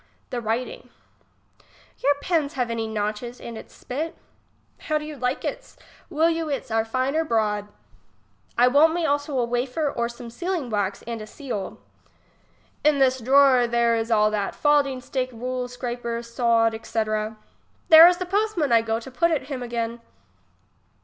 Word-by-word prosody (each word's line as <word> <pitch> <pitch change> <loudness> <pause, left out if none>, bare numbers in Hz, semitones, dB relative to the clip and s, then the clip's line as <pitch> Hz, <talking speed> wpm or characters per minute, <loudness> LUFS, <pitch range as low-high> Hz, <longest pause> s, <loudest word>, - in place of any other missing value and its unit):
l^lic 245 -2 -3
ivriting. 230 +3 -3 1.1
Your 285 +2 +3
pens 320 -6 0
have 250 -3 -1
any 225 -1 -2
notches, 215 +3 -4
and 235 - -8
its 220 - -10
spit. 305 +6 -5 0.6
How 310 - -1
do 300 - -5
you 305 0 -7
like 250 0 -2
its? - - -6 0.3
will 320 -1 +2
you 330 -1 -1
its 275 -5 -4
are 225 0 +2
fine 255 +5 -1
or 320 - +2
broad? 210 -6 0 0.9
I 245 +1 +6
won't 305 +5 +5
me 345 -2 0
also 285 -1 0
a 245 - +2
wafer 250 +5 -1
or 235 0 -2
some 235 0 -10
sealing 345 -3 -3
wax 205 -2 -1
and 230 -1 -5
a 215 - -8
seal. 215 -5 -6 1.1
In 300 -1 +4
this 260 -1 +3
drawer, 260 0 +5
there 235 0 +2
is 225 0 -2
all 215 -2 +3
that, 205 -2 -2
falding 285 -3 +2
stick, 255 0 -3
rule, 250 +1 -4
scraper, 245 -1 -4
saud, 235 -1 +2
etc. 215 -1 -2 0.5
There 320 +1 +11
is 355 0 +3
the 365 - -3
postman 390 - 0
I 230 -1 +6
go 225 0 -1
to 260 +3 -11
put 295 +7 +2
it 295 -4 -2
him 265 -3 -4
again. 235 -1 -3
250 Hz, 170 wpm, -24 LUFS, 230-290 Hz, 1.1 s, There